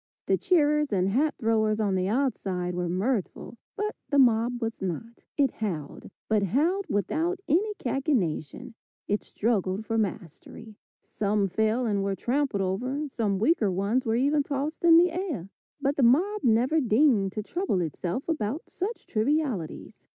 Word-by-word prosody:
The - - +3
cheerers 300 - +2
and 190 -1 +1
hat 285 +9 +1
throwers 220 -2 +1
on 205 -3 +1
the 185 0 0
outside 195 -7 -1
were 175 -1 -2
mirthful, 210 +4 -2 0.2
but 425 +1 -3
the 285 - +1
mob 240 -1 +3
was 225 -1 -4
not; 195 +6 -5 0.2
it 275 -4 +3
howled, 170 -10 -5 0.2
but 215 -1 +2
howled 315 - +1
without 320 - -1
any 410 +8 +1
cachinnation; 245 - -2 0.3
it 205 +1 -1
struggled 205 -2 -1
for 225 0 0
mastery. 205 +2 -5 0.3
Some 205 -1 0
fell 220 +6 0
and 205 -3 0
were 195 0 -1
trampled 255 -2 -1
over, 255 +11 -2
some 210 -6 -1
weaker 225 - +2
ones 200 +7 0
were 225 -3 0
even 285 +4 +2
tossed 285 +3 -3
in 335 -1 +8
the 350 +1 +5
air, 330 - -4 0.3
but 280 +1 -1
the - - +2
mob 355 - +3
never 245 +7 +3
deigned 225 -5 +3
to 215 - -4
trouble 345 - -1
itself 175 - -3
about 300 -3 -3
such 420 +6 -4
trivialities. 235 - -2
230 Hz, 155 wpm, -27 LUFS, 200-290 Hz, 0.3 s, in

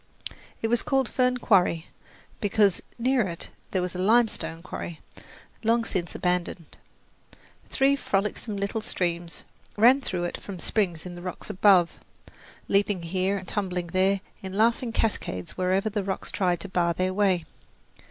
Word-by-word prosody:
It - - +3
was 240 +1 +2
called 270 -3 +1
Fern 250 -1 +1
Quarry, 180 -8 +2 0.5
because 205 -2 +2 0.2
near 255 +2 +2
it 170 -1 -7 0.2
there 185 -2 0
was 180 - -3
a 180 - -5
limestone 210 -5 +2
quarry, 170 -3 -6 0.6
long 230 +1 +2
since 175 -6 -3
abandoned. 180 -2 -2 0.9
Three 275 +1 +3
frolicsome 210 -3 -1
little 200 +3 -2
streams 175 -6 -2 0.3
ran 250 +6 +6
through 180 -8 -2
it 175 - -4
from 200 -2 -7
springs 175 -3 -1
in 180 - -6
the 175 - -9
rocks 180 0 -6
above, 185 -3 +5 0.8
leaping 200 -2 +1
here 185 +3 0
and 190 -1 -8
tumbling 180 -4 -2
there 190 +1 +3 0.2
in 190 -1 -6
laughing 230 +2 +2
cascades 90 - -2
wherever 185 +3 +1
the 210 -1 -1
rocks 190 0 -3
tried 180 -3 0
to - - -5
bar 175 -2 +1
their 185 0 0
way. 190 -4 +2
190 Hz, 150 wpm, -26 LUFS, 180-220 Hz, 0.9 s, ran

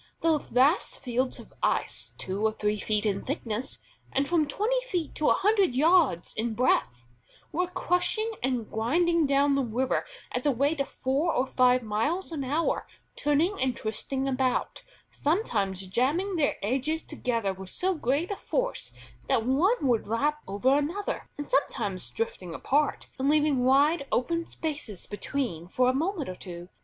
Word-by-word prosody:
The 320 -2 +3
vast 275 +7 +2
fields 255 +1 -1
of - - -13
ice, - - -1
two 190 +3 -4
or 220 - +3
three 210 -1 -1
feet 210 +1 0
in 200 -2 0
thickness, 250 -4 -4 0.3
and 275 +1 +1
from 325 -2 +2
twenty 450 - 0
feet 350 -9 -2
to 305 - +1
a - - +6
hundred 390 - +2
yards 305 - +3
in 225 0 -2
breadth, 125 - +1 0.5
were 360 +3 0
crushing 360 +4 0
and 245 -4 -1
grinding 330 +8 +2
down 280 +1 +3
the 275 - +2
river 250 +3 0 0.3
at 250 - -1
the 280 -1 +1
rate 285 +4 +1
of 275 - -3
four 280 +6 0
or 255 - +2
five 250 -1 +3
miles 230 - -1
an 300 -4 -3
hour, 295 +6 0 0.3
turning 310 +7 +1
and 260 -2 0
twisting 265 +5 -2
about, 260 -1 0 0.3
sometimes 205 - 0
jamming 290 - 0
their 305 -4 +2
edges 270 +9 0
together 230 -9 -2
with 190 0 -7
so 375 - +1
great 305 - 0
a - - -1
force - - -2 0.4
that 225 - +2
one 310 - +2
would 240 -4 +2
lap 290 +7 0
over 205 +8 +2
another, 345 +8 -3
and 290 - -4
sometimes 195 - 0
drifting 180 - -4
apart 290 +2 0
and 270 +2 +2
leaving 295 -4 +3
wide 280 +3 +4
open 335 +6 0
spaces 290 - -5
between 205 - -3
for 250 +7 +2
a - - +2
moment 325 +3 -1
or 185 - -4
two. 175 -1 -8
270 Hz, 165 wpm, -28 LUFS, 230-320 Hz, 0.5 s, a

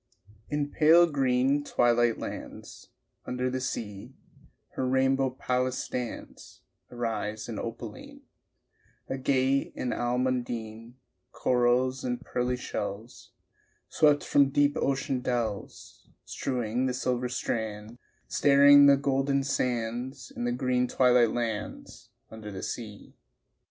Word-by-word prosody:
H.) 105 - -23 0.2
In 145 -1 -2
pale 165 +3 +6
green 135 -2 +1
twilight 120 -3 +2
lands - - -8 0.4
Under 125 0 -2
the 130 0 -3
sea 105 -6 -5 0.5
Her 130 - -3
rainbow 135 0 +2
palace 125 0 -1
stands, 125 -2 -6 0.3
Irised 110 -3 -3
and - - -5
opaline; - - -8 0.9
Agate 135 0 0
and 125 - -2
almondine, 120 -2 -2 0.4
Corals 125 +1 +1
and 125 -1 -2
pearly 125 -1 -2
shells 110 -1 -6 0.6
Swept 150 -2 +3
from 140 -1 +3
deep 145 +1 +2
ocean 135 -1 -1
dells, 120 -5 -4 0.2
Strewing 125 0 -2
the 125 - -2
silver 125 -1 -1
strands, 110 -1 -4 0.3
Starring 145 0 +6
the 140 0 +6
golden 140 0 0
sands 125 0 -3
In 120 - -3
the 120 - 0
green 125 0 0
twilight 125 -3 +4
lands 115 -2 -5 0.2
Under 110 -1 -8
the 95 - -7
sea. 105 -3 -7
125 Hz, 110 wpm, -28 LUFS, 120-135 Hz, 0.9 s, pale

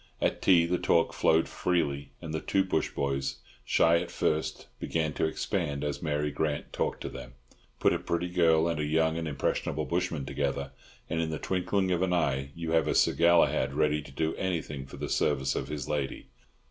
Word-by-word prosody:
At - - 0
tea 85 -3 +5
the 90 +1 0
talk 85 - +2
flowed 80 +1 +3
freely, 70 -6 -1
and 80 -1 -5
the 80 - -1
two 95 - +2
bush 95 - 0
boys, 70 -1 -2 0.3
shy 85 0 +4
at - - -5
first, 80 0 -1
began 80 -2 -1
to - - 0
expand 75 -2 -2
as 75 -1 -3
Mary 75 -2 -1
Grant 75 -1 -2
talked - - -2
to - - -4
them. 65 -1 -9 0.5
Put - - +4
a - - -1
pretty 85 +1 -2
girl 85 -2 +3
and 85 -2 -1
a - - 0
young 80 +2 +2
and 80 -1 -3
impressionable 75 +1 -1
bushman 85 -2 -1
together, 70 +1 -2 0.4
and 80 - -1
in 80 - -1
the 80 - -3
twinkling 95 +3 0
of 90 -1 +1
an 95 -1 +1
eye 70 -5 0
you 85 -1 -4
have 80 -1 +3
a - - +1
Sir - - +4
Galahad 85 -5 +3
ready 75 0 +2
to 70 - -12
do 80 +3 -1
anything 80 -7 -3
for - - -10
the - - -4
service 65 0 +1
of - - -2
his 75 -2 -5
lady. 70 -3 -3
80 Hz, 200 wpm, -29 LUFS, 70-85 Hz, 0.5 s, tea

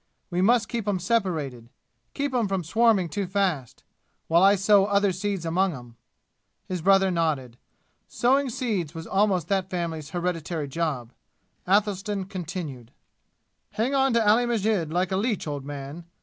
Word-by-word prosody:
We 175 +1 0
must 225 +2 +3
keep 230 -3 -4
'em 200 -2 +1
separated 165 - -1 0.5
keep 280 -1 -2
'em 240 -4 +1
from 190 -2 -1
swarming 215 +1 +3
too 190 +5 -3
fast 180 - -1 0.4
while 170 +1 +4
I 195 +1 +6
sow 200 0 +4
other 200 -1 +2
seeds 190 -1 -3
among 180 +1 +1
'em." 120 -2 -12 0.7
His 180 -2 -3
brother 195 +1 +4
nodded. 150 -8 -1 0.5
Sowing 265 +3 +2
seeds 220 - -2
was 165 0 -6
almost 195 -4 +1
that 190 -2 0
family's 165 -5 -4
hereditary 170 -3 -3
job. 135 -6 -3 0.5
Athelstan 200 0 +1
continued: 170 - -6 0.8
"Hang 235 +6 0
on 270 -2 +3
to 230 -2 +2
Ali 235 +4 +4
Masjid 210 -8 0
like 180 +2 0
a 190 - +1
leech, 215 0 -1
old 145 -3 -5
man! 145 +3 -7
185 Hz, 150 wpm, -25 LUFS, 165-210 Hz, 0.8 s, I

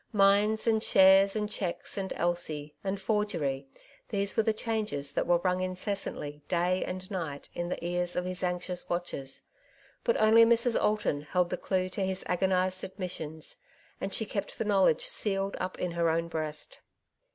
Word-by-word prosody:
Mines, 205 +2 +4
and 220 -2 +2
shares, 195 0 +6
and 210 -1 -1
cheques, 190 -4 -2
and 195 -1 -3
Elsie, 160 -4 -1
and 195 0 -2
forgery 175 -10 -1 0.2
— - - -28
these 200 -1 -1
were - - +4
the 220 - +2
changes 215 - -2
that - - -1
were 175 0 +4
rung 180 +1 0
incessantly 185 -5 -3
day 180 +1 +1
and 185 +1 -6
night 160 -7 -5
in 175 0 -3
the 170 - -4
ears 175 0 0
of 180 - -1
his 180 0 -2
anxious 180 0 -3
watchers; 175 -6 -3 0.6
but 475 - +2
only 220 +1 +6
Mrs. 235 +1 +4
Alton 210 -9 +1
held 175 +4 0
the - - +1
clue 185 -1 -1
to 190 - -5
his 190 0 -1
agonized 185 0 +1
admissions, 175 -5 -5 0.4
and 195 - -3
she 220 - +1
kept 200 -1 -4
the 225 - -2
knowledge 190 -6 +3
sealed 195 -1 0
up 185 0 -4
in 180 - -2
her 170 0 +1
own 165 +1 0
breast. 155 -2 -3
185 Hz, 175 wpm, -29 LUFS, 175-200 Hz, 0.6 s, shares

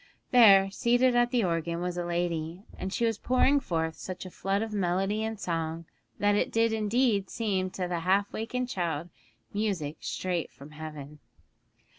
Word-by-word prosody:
There, 195 -6 +7
seated 245 +4 +3
at 240 0 +4
the 245 -2 +1
organ, 170 -1 -1
was 180 0 -2
a 175 - -2
lady, 170 0 -2
and 190 - -5
she 235 - 0
was 225 -2 0
pouring 260 +3 +3
forth 160 - -2
such 185 0 -7
a 185 - -8
flood 195 +4 -1
of 220 -1 -5
melody 195 +2 0
and 220 -1 -3
song 165 -2 -3 0.3
that 205 0 +3
it 205 - +1
did 225 0 +2
indeed 220 -2 +1
seem 195 -5 -1
to 185 -1 -3
the 175 -1 -2
half 195 +4 +1
wakened 250 +3 -2
child 170 -6 -2 0.4
music 190 -8 -2
straight 180 -3 -3
from 140 +2 -13
heaven. 150 -1 -8
190 Hz, 170 wpm, -28 LUFS, 170-220 Hz, 0.4 s, There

